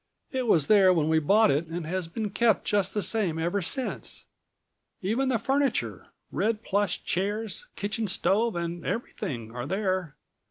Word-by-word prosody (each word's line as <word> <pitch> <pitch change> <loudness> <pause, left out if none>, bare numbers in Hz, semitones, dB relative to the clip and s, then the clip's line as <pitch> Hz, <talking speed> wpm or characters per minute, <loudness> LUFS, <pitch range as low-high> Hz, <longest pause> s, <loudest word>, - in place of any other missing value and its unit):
It 260 -2 -1
was 160 -9 +4
there 195 -1 +6
when 160 -3 +2
we 160 0 +4
bought 205 +8 +4
it 150 +4 0
and 165 0 -4
has 180 +1 -2
been 210 +4 -4
kept 225 0 +2
just 205 -1 +1
the 210 - 0
same 190 -4 0
ever 175 +5 0
since. 255 - -2 0.8
Even 240 +8 +1
the 250 - +2
furniture, 270 +4 0 0.2
red 220 0 0
plush 200 -2 0
chairs, 210 - -2
kitchen 210 +2 -2
stove 210 +3 +1
and 170 0 -3
everything, 120 - -4
are 120 - -4
there. 185 -5 -1
200 Hz, 160 wpm, -27 LUFS, 170-220 Hz, 0.8 s, there